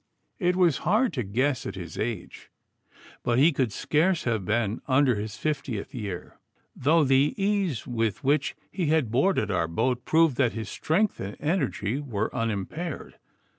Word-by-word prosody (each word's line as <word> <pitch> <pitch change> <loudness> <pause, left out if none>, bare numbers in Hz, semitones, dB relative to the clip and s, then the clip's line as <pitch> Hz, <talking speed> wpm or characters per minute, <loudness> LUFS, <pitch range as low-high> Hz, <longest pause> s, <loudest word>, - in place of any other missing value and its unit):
It 180 -2 +2
was 175 -6 +3
hard 215 +8 +2
to 130 - -1
guess 125 +6 0
at 95 - -5
his 90 -2 -7
age, 115 -1 -5 0.7
but 120 0 +1
he 150 +6 +6
could 130 -6 0
scarce 165 - +1
have 110 -5 0
been 110 +1 0
under 130 -1 +4
his 105 0 -4
fiftieth 135 -5 -3
year, 100 -8 -6 0.4
though 155 +4 +3
the 135 +1 +3
ease 195 - 0
with 115 -1 -1
which 140 +1 +1 0.2
he 175 -3 -1
had 150 -7 +2
boarded 125 - +2
our 85 -4 +1
boat 120 +9 0
proved 160 -5 +3
that 120 -4 +2
his 110 -1 -5
strength 195 +6 0
and 100 +2 -6
energy 145 - -1
were 110 -7 -3
unimpaired. 115 - -4
130 Hz, 160 wpm, -26 LUFS, 110-160 Hz, 0.7 s, he